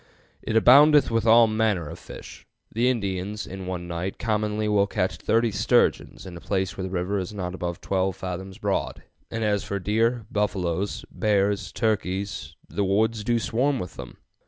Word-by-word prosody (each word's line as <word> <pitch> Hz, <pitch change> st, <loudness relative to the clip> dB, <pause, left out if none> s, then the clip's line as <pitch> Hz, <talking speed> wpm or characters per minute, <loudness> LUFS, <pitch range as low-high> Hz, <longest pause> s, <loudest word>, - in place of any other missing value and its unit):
It 110 Hz, -, -3 dB
aboundeth 140 Hz, +4 st, +6 dB
with 115 Hz, 0 st, +1 dB
all 115 Hz, +1 st, +7 dB
manner 110 Hz, -6 st, 0 dB
of 85 Hz, +3 st, -8 dB
fish. -, -, -11 dB, 0.2 s
The 120 Hz, +3 st, +2 dB
Indians 100 Hz, -3 st, -2 dB
in 95 Hz, 0 st, -8 dB
one 90 Hz, -1 st, -4 dB
night 85 Hz, +3 st, -4 dB
commonly 105 Hz, -1 st, -1 dB
will 100 Hz, -1 st, +3 dB
catch 95 Hz, -2 st, -1 dB
thirty 115 Hz, 0 st, +1 dB
sturgeons 100 Hz, -, +1 dB
in 90 Hz, -2 st, -8 dB
a 85 Hz, -, -9 dB
place 95 Hz, -3 st, -2 dB
where -, -, -6 dB
the 95 Hz, -, -3 dB
river 95 Hz, +2 st, -1 dB
is 95 Hz, +3 st, -5 dB
not 90 Hz, -2 st, -4 dB
above 90 Hz, -2 st, -4 dB
12 95 Hz, -1 st, 0 dB
fathoms 95 Hz, 0 st, -6 dB
broad, -, -, -2 dB, 0.3 s
and 115 Hz, -1 st, -3 dB
as 105 Hz, -2 st, +1 dB
for 100 Hz, -, -3 dB
deer, 115 Hz, +4 st, 0 dB
buffaloes, 100 Hz, -2 st, -1 dB
bears, 100 Hz, -4 st, 0 dB
turkeys, 100 Hz, -2 st, -2 dB
the 100 Hz, -, -2 dB
woods 105 Hz, +3 st, +1 dB
do 120 Hz, +2 st, +1 dB
swarm 130 Hz, +5 st, 0 dB
with 90 Hz, -8 st, -6 dB
them. -, -, -10 dB
100 Hz, 175 wpm, -25 LUFS, 95-110 Hz, 0.3 s, all